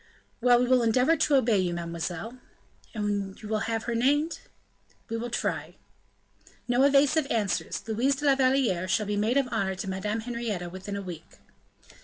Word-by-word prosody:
"Well! 245 0 +5
we 250 - +2
will 255 0 +4
endeavor 250 +7 +3
to 295 - +2
obey 230 -6 +3
you, 175 -2 0
mademoiselle." 170 +7 -5 0.6
"And 205 -2 -2
you 215 - -9
will 215 0 0
have 225 -1 -1
her 240 - -2
named?" 290 +7 +1 0.7
"We 230 - -3
will 240 +1 -4
try." - - -3 0.9
"No 245 +1 +2
evasive 280 +2 +4
answers, 210 -4 -1
Louise 240 +5 +1
de 295 +3 -5
la 280 - +6
Valliere 255 -9 +2
shall 210 +3 +1
be 205 0 -2
maid 220 +6 +1
of 275 -2 +2
honor 190 -1 -1
to 195 +1 -6
Madame 210 +4 -2
Henrietta 220 -7 -4
within 190 +2 -6
a 200 - -4
week." 170 -4 -9
225 Hz, 175 wpm, -27 LUFS, 195-255 Hz, 0.9 s, la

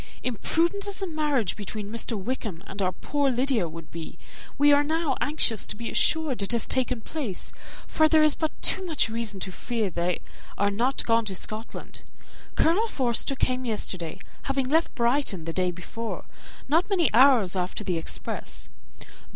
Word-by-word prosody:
Imprudent 335 - 0
as 400 -2 -3
a - - +1
marriage 300 - 0
between 210 0 -6
Mr. 230 -1 -2
Wickham 205 -4 -4
and 200 - -6
our 185 -1 +2
poor 285 +7 0
Lydia 250 -7 +1
would 165 0 -10
be, 165 -1 -7 0.4
we 290 +1 +6
are 285 0 +5
now 315 -2 0
anxious 260 -8 +2
to - - -4
be 230 +2 -5
assured 310 -8 +2
it 200 +4 0
has 235 - +1
taken 255 -2 0
place, 230 - -4 0.3
for 315 -1 +3
there 310 0 +6
is 305 -1 +6
but 315 -1 -1
too 380 - +3
much 315 -10 +1
reason 225 -3 -2
to 190 - -3
fear 220 0 -2
they 175 +1 0 0.4
are 200 0 +2
not 245 +6 0
gone 230 -1 +3
to 195 -2 -4
Scotland. 215 +4 -5 0.5
Colonel 385 +8 +3
Forster 260 - 0
came 255 -1 0
yesterday, 185 -8 -3 0.3
having 270 -1 +1
left 320 +5 +2
Brighton 235 - +1
the 165 - -3
day 180 0 +1
before, 200 +6 -6 0.4
not 330 +8 +2
many 350 - +2
hours 240 -7 +6
after 185 +3 -2
the 180 -4 -1
express. - - -4
240 Hz, 170 wpm, -26 LUFS, 200-290 Hz, 0.5 s, we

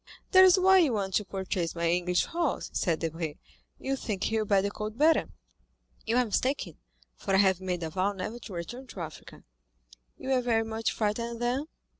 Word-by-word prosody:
"That's 375 0 +8
why 380 +1 +6
you 305 -8 +3
want 195 -3 -2
to 210 - +1
purchase 185 -3 -3
my 170 0 0
English 180 +1 +1
horse," 335 -4 -2
said 165 -3 0
Debray, 165 -2 -3 0.4
"you 270 0 -2
think 210 -7 -4
he 220 0 +1
will 215 - -1
bear 200 -2 +3
the 200 - -1
cold 215 +1 -5
better." 315 +3 +3 0.8
"You 230 +2 +2
are 250 - +4
mistaken, 225 - -1 0.4
for 195 - -1
I - - +5
have 190 -2 +3
made 180 -2 -3
a 160 - -4
vow 190 +3 0
never 205 +4 -5
to 210 -3 -10
return 240 +10 -6
to 190 - -8
Africa." 155 -2 -9 0.7
"You - - -7
were 260 -1 +3
very 230 -2 +1
much 225 0 -2
frightened, 230 +2 -2
then?" 250 +5 -1
210 Hz, 195 wpm, -28 LUFS, 185-250 Hz, 0.8 s, That's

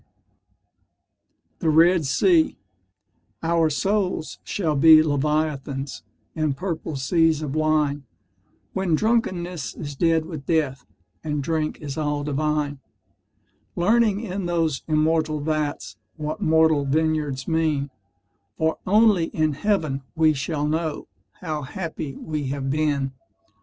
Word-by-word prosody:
THE 165 - +1
RED 165 0 +4
SEA 320 - +3 0.9
Our 165 -1 +2
souls 190 0 -1
shall 165 -7 -1
be 155 +2 +8
Leviathans 145 -2 -1 0.3
In 155 -3 -1
purple 165 -2 -4
seas 155 +3 +2
of 140 -3 -4
wine 150 -2 +1 0.7
When 190 -4 +1
drunkenness 180 -5 -1
is 145 -2 -6
dead 165 +1 +2
with 155 -5 -8
death, 140 -6 0 0.4
And 150 -2 -2
drink 155 0 -2
is 145 0 -5
all 145 -1 -1
divine; 150 0 -1 1.0
Learning 210 +2 +2
in 195 -4 -4
those 165 -5 0
immortal 155 0 +1
vats 150 -1 -2 0.2
What 155 +5 -5
mortal 160 -4 +3
vineyards 150 -2 0
mean; 155 -4 0 0.7
For 160 0 0
only 210 -3 +4
in 155 -2 0
heaven 155 -5 0
we 160 -1 +4
shall 145 +2 -2
know 155 0 -2 0.3
How 155 -4 -3
happy 155 -1 -5
we 150 -3 -4
have 135 0 -2
been. 145 -2 0
155 Hz, 115 wpm, -23 LUFS, 145-165 Hz, 1.0 s, be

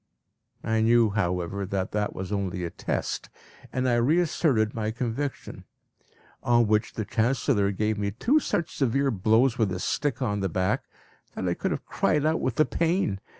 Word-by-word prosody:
I 110 0 +1
knew, 115 -1 +4
however, 90 -1 -1
that 95 -1 -2
that 105 0 -2
was 95 +1 -5
only 95 -3 -2
a 85 - -3
test, - - -3 0.4
and 130 0 0
I 120 -1 +3
reasserted 140 -4 +2
my 110 -1 -2
conviction; 125 +4 -4 0.8
on 120 -1 +3
which 110 +1 +1
the 110 - -3
Chancellor 115 -1 +1
gave 105 +2 -1
me 100 -1 0
two 235 - +2
such 170 - -2
severe 135 +1 +1
blows 115 +5 +2
with 105 -4 +2
a 90 - -3
stick 145 +8 -1
on 105 -6 -1
the 95 -1 -1
back, 95 +2 0 0.5
that 95 - -3
I 90 - +2
could - - -2
have - - -3
cried 150 -1 +1
out 160 +1 +1
with 130 - -1
the 155 - +4
pain. 165 - 0
110 Hz, 175 wpm, -26 LUFS, 100-130 Hz, 0.8 s, knew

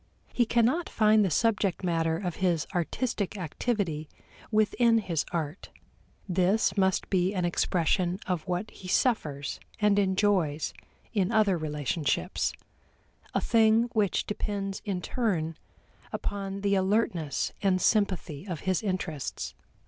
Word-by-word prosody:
He 240 -2 +2
cannot 245 +10 +2
find 215 -1 +4
the 190 - +1
subject 200 0 +1
matter 165 -2 +1
of 180 -2 -4
his 175 -5 +1
artistic 205 +3 -1
activity 170 -3 -2 0.4
within 230 +2 +3
his 175 -8 -1
art; 160 0 -4 0.6
this 185 +4 +2
must 190 -2 +2
be 190 +1 +2
an 180 -2 0
expression 175 +1 +1
of 180 0 -2
what 180 +4 -2
he 185 - -11
suffers 150 - 0 0.2
and 210 -1 +4
enjoys 190 -6 +1 0.4
in 200 -2 +1
other 215 -4 +4
relationships 150 -1 -1 0.8
a - - +2
thing 225 +1 +4
which 210 -5 +1
depends 200 -2 -3
in 185 -4 -2
turn 170 -10 -1 0.6
upon 195 -1 -4
the 200 0 +1
alertness 190 -6 +1
and 190 -2 +2
sympathy 185 -7 0
of 175 -5 -4
his 185 -1 0
interests. 185 -8 -3
190 Hz, 125 wpm, -28 LUFS, 170-210 Hz, 0.8 s, find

